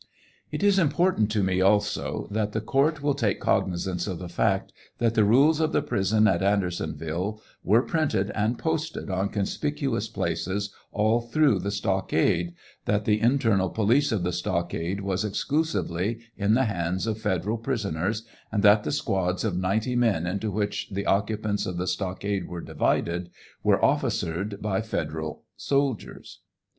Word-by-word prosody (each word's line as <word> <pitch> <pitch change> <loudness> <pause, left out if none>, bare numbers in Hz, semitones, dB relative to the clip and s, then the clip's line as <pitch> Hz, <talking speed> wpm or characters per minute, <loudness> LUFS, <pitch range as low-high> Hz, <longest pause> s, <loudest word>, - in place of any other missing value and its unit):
It - - -3
is 200 -1 +5
important 160 - +2
to 105 -2 +1
me, 95 0 +1
also, 105 +2 +1
that 105 0 -1
the 110 - 0
court 140 +7 +1
will 145 -1 +2
take 115 -8 0
cognizance 90 0 0
of 95 -4 -3
the 90 +1 -7
fact 95 +3 0 0.2
that 115 -2 +1
the 110 - +4
rules 140 +9 +5
of 160 -1 +1
the - - +2
prison 105 +2 +2
at 90 -4 +2
Andersonville 90 0 -1 0.2
were 115 +5 +4
printed 140 -13 0
and 110 +3 0
posted 160 -8 -2
on 95 +1 0
conspicuous 135 +5 -2
places 100 +2 -2 0.2
all 110 +3 +2
through 120 -2 +2
the 100 +3 -2
stockade, 95 -3 0 0.3
that 105 0 +1
the 105 -1 +2
internal 115 -6 +3
police 120 +9 +2
of 105 -5 0
the 90 0 -1
stockade 85 +1 -2
was 95 +1 -1
exclusively 110 - -1 0.2
in 105 +1 +2
the 130 +2 +3
hands 90 -2 -1
of 110 -1 -2
federal 105 +2 -1
prisoners, 110 -4 -2 0.3
and 105 -2 0
that 105 0 +6
the - - -2
squads 95 -10 0
of 105 -5 -1
ninety 105 +7 0
men 115 -9 +2
into 100 +4 -2
which 105 0 -2
the 100 0 -3
occupants 105 +1 0
of 90 - -4
the 90 - -1
stockade 95 +1 -2
were 85 -1 -6
divided, 85 +1 -1 0.3
were - - +3
officered 100 +5 -1
by 105 0 0
federal 80 -7 -4
soldiers. 140 -4 -2
105 Hz, 155 wpm, -26 LUFS, 95-115 Hz, 0.3 s, that